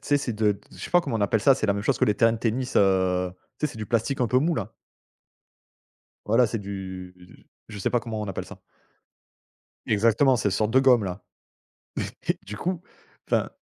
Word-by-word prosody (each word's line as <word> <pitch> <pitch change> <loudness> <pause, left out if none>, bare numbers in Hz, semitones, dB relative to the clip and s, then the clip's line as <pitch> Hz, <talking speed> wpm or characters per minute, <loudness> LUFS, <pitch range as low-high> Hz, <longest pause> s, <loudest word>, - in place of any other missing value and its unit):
sais, 145 - +2
c'est 130 -3 -3
de 105 -1 +2
d 100 - -12
je - - -14
sais - - -7
pas 175 - +5
comment 120 -9 -3
on - - -3
appelle 100 +2 +2
ça. 135 +5 +6
C'est 120 - -2
la 100 - +3
même 100 - -3
chose - - +1
que - - +4
les 105 - +2
terrains 115 +1 +4
de 115 - -3
tennis, 125 +3 -2
heu, 95 -2 +3 0.3
tu 150 - +1
sais, - - -8
c'est - - -11
du 105 - -5
plastique 120 +5 0
un 125 - +3
peu 125 +3 +3
mou, 165 +5 +1
là. - - -4 1.5
Voilà, 115 +3 +4
c'est 115 +1 -3
du, 95 -2 -7
du 90 0 -18 0.2
je 105 -2 -8
sais 95 - -1
pas 120 - +2
comment 110 -2 -5
on 105 - -3
appelle 95 - -4
ça. - - -13 1.3
Exactement. 115 +5 +3
C'est 105 - 0
une - - -1
sorte 105 +1 0
de 130 +3 +5
gomme, 125 -5 +5
là. 95 0 -5 1.1
Et - - +5
et - - -22
du 105 - -7
coup, 180 - -3 0.5
enfin, - - +1
110 Hz, 235 wpm, -25 LUFS, 100-125 Hz, 1.5 s, ça